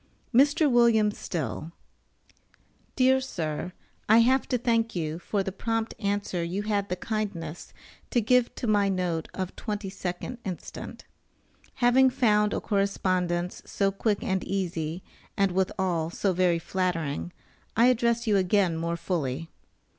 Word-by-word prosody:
MR. 285 +6 +4
WM. 235 -6 +4
STILL 165 -4 -4 1.2
Dear 260 0 +4
Sir: 165 - -4 0.4
I 220 - +7
have 260 +3 +3
to 250 - +1
thank 230 -2 +1
you 160 -1 -2
for 200 +2 -1
the 195 - -3
prompt 225 +3 -2
answer 200 -4 -1
you 180 +5 -2
had 205 -1 -1
the 180 - 0
kindness 180 -6 -4 0.4
to 245 - +2
give 245 +2 +2
to - - -4
my 205 -3 +3
note 180 -4 -1
of 185 -1 -4
22d 200 +1 -5
inst. 185 -3 -6 1.0
Having 260 +1 +5
found 210 -5 +2
a - - -1
correspondence 185 -3 0
so 195 -1 +1
quick 205 +1 -1
and 190 -1 0
easy, 175 -3 -3 0.3
and 195 -2 +3
withal 185 -3 0
so 190 +2 0
very 180 -1 +3
flattering, 170 -3 -2 0.5
I 230 - +6
address 235 -1 +2
you 210 -3 +3
again 185 -2 +2
more 170 +1 -2
fully. 165 -3 -2
195 Hz, 135 wpm, -27 LUFS, 175-225 Hz, 1.2 s, I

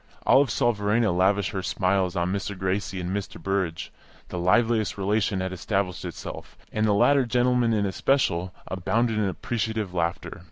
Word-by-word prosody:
Olive 135 0 +5
saw 120 +2 +2
Verena 105 0 +1
lavish 95 +2 +2
her 95 -3 -3
smiles 95 -1 0
on 85 +1 0
Mr. 100 0 -3
Gracie 95 +1 -2
and 90 +2 -3
Mr. 100 -1 -5
Burrage; 95 -4 -2 0.4
the 90 - -4
liveliest 110 +4 +2
relation 100 -1 0
had 95 0 -3
established 95 0 -2
itself, - - -8
and 110 0 +1
the 105 - +3
latter 140 +6 +4
gentleman 125 0 +2
in 105 -2 +1
especial 95 -4 +1
abounded 110 +4 0
in 105 - +1
appreciative 110 +1 -2
laughter. 85 -1 -2
100 Hz, 160 wpm, -25 LUFS, 95-110 Hz, 0.4 s, Olive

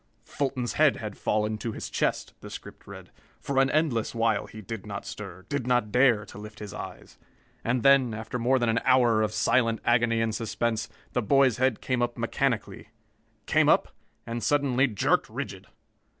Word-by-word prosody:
"Fulton's 130 -3 -2
head 155 -3 +4
had 105 -3 -6
fallen 105 0 -1
to 115 +1 -4
his - - -6
chest," - - -1
the - - -9
script - - -10
read. - - -11 0.3
"For 135 0 -1
an 135 - +2
endless 140 -8 0
while 115 -2 +1
he 110 - -11
did 110 0 -7
not - - -6
stir, 95 +2 -8
did 140 -4 -3
not 120 -4 +1
dare 120 -3 +4
to - - -11
lift 105 0 -10
his 105 -2 -8
eyes. - - -9 0.4
And 120 +1 0
then, 135 -3 +5
after 110 +3 -5
more 125 +3 +3
than 120 -2 +1
an 115 0 +2
hour 120 -4 +4
of 105 -1 0
silent 115 +1 +2
agony 120 -1 +3
and 115 -1 0
suspense, 115 0 -2 0.2
the 125 - +1
boy's 130 +1 +3
head 130 -3 +1
came 125 -2 -1
up 120 0 -1
mechanically. - - -2 0.6
Came - - +3
up - - +3 0.3
and 115 0 -4
suddenly 140 -2 +2
jerked 105 -6 +1
rigid. - - -6
120 Hz, 180 wpm, -27 LUFS, 110-130 Hz, 0.6 s, then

